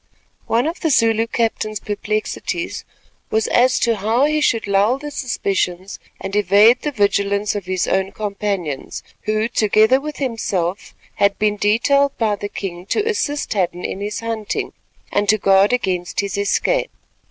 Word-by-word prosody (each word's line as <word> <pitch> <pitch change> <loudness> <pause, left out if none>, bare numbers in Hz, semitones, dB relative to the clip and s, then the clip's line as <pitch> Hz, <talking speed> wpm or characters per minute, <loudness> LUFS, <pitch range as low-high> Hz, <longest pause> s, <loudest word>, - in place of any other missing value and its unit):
One 235 +3 +2
of 330 +3 -3
the 325 - 0
Zulu 225 -4 +3
captain's 220 -2 -1
perplexities 215 +1 -3 0.4
was 220 0 +1
as 255 +1 +4
to 230 -2 +2
how 225 +7 +2
he 305 +1 +1
should 230 -5 +1
lull 200 +5 +2
the 295 +1 -7
suspicions 195 -8 -2 0.2
and 195 +1 -5
evade 210 +4 +5
the 295 - -2
vigilance 200 -2 +1
of 200 -3 -5
his 185 -1 -1
own 190 0 0
companions, 200 -8 -4 0.3
who 215 +1 +1
together 220 +3 +3
with 300 0 -6
himself 200 -8 -2 0.2
had 200 -1 +2
been 210 -1 +1
detailed 270 +7 +2
by 215 -3 +1
the 205 0 -6
king 180 -2 -6
to 425 - 0
assist 370 -11 -1
Hadden 180 -3 -1
in 195 - -4
his 205 +1 -4
hunting 225 -2 -3 0.4
and 205 0 0
to 215 - +5
guard 195 +1 +4
against 185 -8 -1
his 200 -1 -4
escape. - - 0
210 Hz, 155 wpm, -19 LUFS, 200-240 Hz, 0.4 s, evade